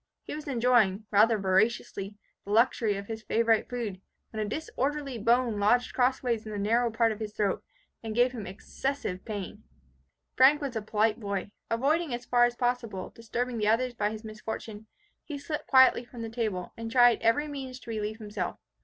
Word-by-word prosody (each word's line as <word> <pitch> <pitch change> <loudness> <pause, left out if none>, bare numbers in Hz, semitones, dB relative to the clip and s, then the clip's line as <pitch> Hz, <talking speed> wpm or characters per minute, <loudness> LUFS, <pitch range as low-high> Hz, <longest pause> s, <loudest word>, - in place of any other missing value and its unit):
He - - -7
was 300 0 -7
enjoying, 230 -6 +2
rather 220 +2 +5
voraciously, 200 0 0 0.3
the - - -12
luxury 225 -2 +3
of 200 - -6
his 220 +1 -6
favourite 225 0 +2
food, 220 -7 -4 0.3
when 220 -1 -2
a 210 - -4
disorderly 280 -1 -3
bone 235 0 +2
lodged 245 +5 +2
crossways 250 -3 +1
in 215 - -8
the 210 - -4
narrow 230 +4 +2
part 225 0 +2
of 215 - -5
his 215 -1 -5
throat, 205 -3 -1 0.4
and 220 -1 -5
gave 245 +1 +4
him 220 -6 -6
excessive 195 +1 -4
pain. 210 0 -6 0.7
Frank 270 +3 +6
was 275 -5 -4
a 220 - -1
polite 215 +2 +1
boy. 200 -2 -3 0.2
Avoiding, 280 +4 +1
as 240 0 -8
far 240 -1 +4
as 240 0 -1
possible, 240 -6 -2
disturbing 235 +1 -3
the 210 - +1
others 240 +3 +2
by 210 -3 0
his 215 +1 -7
misfortune, 220 0 -7 0.4
he 295 - -6
slipped 300 +2 -5
quietly 260 -2 +6
from 240 -1 -9
the 225 - -4
table, 215 -6 -3
and 230 0 -6
tried 245 0 +5
every 230 +7 +2
means 265 -3 -6
to 230 - -8
relieve 215 0 -3
himself. 205 -4 -4
230 Hz, 185 wpm, -28 LUFS, 210-245 Hz, 0.7 s, Frank